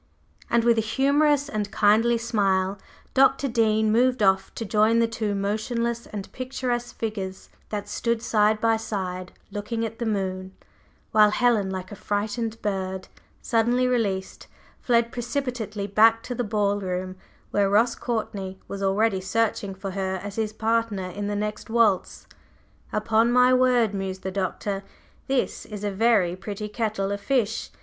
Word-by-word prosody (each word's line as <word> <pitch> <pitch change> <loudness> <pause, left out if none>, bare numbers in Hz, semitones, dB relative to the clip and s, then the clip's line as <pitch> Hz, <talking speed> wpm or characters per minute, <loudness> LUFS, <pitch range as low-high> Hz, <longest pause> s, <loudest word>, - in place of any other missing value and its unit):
And 235 -1 +3
with 235 -1 +4
a - - +3
humorous 285 +5 +2
and 210 -5 -3
kindly 220 +3 +3
smile, 195 -4 0 0.3
Dr. 270 +1 +4
Dean 220 -3 +2
moved 250 0 +3
off 190 0 +3
to 225 - -4
join 215 +2 +3
the 230 0 +3
two 220 -2 -2
motionless 230 +4 -2
and 200 -2 -7
picturesque 250 -2 -3
figures 195 -4 -4 0.2
that 205 -1 -4
stood 230 +2 -1
side 215 -1 +3
by 225 0 +3
side 185 -4 -4 0.2
looking 225 +3 -3
at 225 0 -7
the 235 - -1
moon, 190 -2 -2 0.6
while 215 -1 +6
Helen, 220 -3 +2
like 185 -1 -5
a - - -6
frightened 215 +3 -2
bird 190 -2 -3 0.3
suddenly 240 +2 +2
released, 200 -6 -1 0.3
fled 235 -1 +2
precipitately 240 -4 -3
back 225 +3 +4
to 250 - -4
the 245 - -2
ball 205 -2 0
room, 185 -1 -3 0.4
where 200 -1 +2
Ross 225 +4 +3
Courtney 200 -5 -4
was 200 - -6
already 195 0 +1
searching 200 0 -1
for 195 0 -5
her 190 0 -2
as 205 -1 -6
his 220 -2 -1
partner 220 -4 -1
in 205 +2 -4
the 205 - -2
next 210 +1 -4
waltz. 220 -5 +1 0.7
"Upon 220 +2 +2
my 250 +1 +5
word," 250 -4 +3
mused 190 -1 -4
the 190 - -3
Doctor, 195 +1 -2 0.4
"this 265 -1 -1
is 210 -1 -8
a 205 - -1
very 200 -4 +3
pretty 205 +2 -6
kettle 210 -3 -2
of 200 0 -3
fish! 225 -2 0
215 Hz, 155 wpm, -25 LUFS, 195-235 Hz, 0.7 s, while